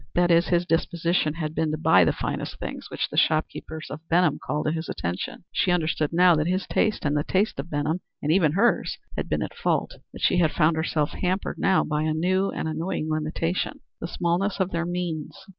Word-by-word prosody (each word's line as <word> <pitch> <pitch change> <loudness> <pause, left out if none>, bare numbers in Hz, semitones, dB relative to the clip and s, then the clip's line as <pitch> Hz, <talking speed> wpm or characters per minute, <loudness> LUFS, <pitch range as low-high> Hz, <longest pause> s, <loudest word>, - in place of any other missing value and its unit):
That 175 0 +3
is, 170 +1 +4
his 175 0 +2
disposition 170 -1 0
had 155 -2 -3
been 160 -1 0
to 155 - -1
buy 95 - +5
the - - +3
finest - - -4
things - - -6
which - - -2
the - - -6
shopkeepers 155 0 0
of 150 - -5
Benham 170 -3 +3
called 150 - -2
to 155 - +2
his 160 0 -4
attention. 90 - -4
She - - +1
understood 160 -3 +1
now 175 +1 +6
that 155 +1 0
his 185 +1 0
taste 215 -6 0
and 145 0 +1
the 145 - +1
taste 195 -2 0
of 145 +5 -5
Benham, 150 +4 -1 0.2
and 150 - 0
even 160 -4 +3
her's, 225 +7 +2 0.2
had - - -3
been - - 0
at - - -6
fault, - - 0 0.2
but - - -11
she 180 -1 +3
found 155 +1 +2
herself 160 -2 0
hampered 185 +2 -2
now 190 -1 +3
by 150 0 -1
a 155 0 0
new 185 +4 +1
and - - -3
annoying 160 0 -2
limitation, 155 +3 -2 0.2
the - - -4
smallness 175 +4 -1
of 190 0 0
their 170 0 -1
means. 175 -4 -4
165 Hz, 210 wpm, -25 LUFS, 155-180 Hz, 0.2 s, now